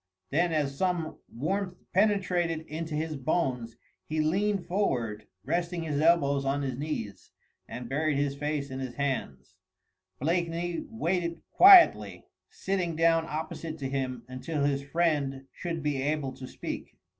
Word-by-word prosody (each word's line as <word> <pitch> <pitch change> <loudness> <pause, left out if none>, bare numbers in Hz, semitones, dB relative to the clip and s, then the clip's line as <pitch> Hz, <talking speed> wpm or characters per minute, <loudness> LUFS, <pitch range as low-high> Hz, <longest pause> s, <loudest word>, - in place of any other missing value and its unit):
Then 170 +4 +2
as 145 -3 0
some 170 -1 -1
warmth 180 +8 -2 0.2
penetrated 180 -5 +2
into 160 0 -5
his 155 0 -2
bones, 130 -5 -1 0.3
he 155 +1 -2
leaned 195 +5 +1
forward, 120 - -1 0.2
resting 170 0 -1
his 150 -2 -1
elbows 140 -4 +3
on 140 +1 0
his 130 -2 -2
knees 125 -8 -5 0.4
and 125 -1 -7
buried 150 +2 0
his 140 -1 0
face 145 -1 -2
in 130 - -5
his 130 -2 -5
hands. 95 - -3 0.7
Blakeney 170 +2 -1
waited 175 -6 -2
quietly, 375 -2 +7 0.2
sitting 185 -4 -2
down 165 0 +3
opposite 160 +1 -5
to 135 -3 -3
him, 130 -3 -3
until 140 +4 -3
his 140 -1 +1
friend 140 -3 0
should 165 -3 -4
be 145 -3 0
able 145 -1 -1
to 130 0 -9
speak. - - -7
155 Hz, 140 wpm, -29 LUFS, 135-170 Hz, 0.7 s, quietly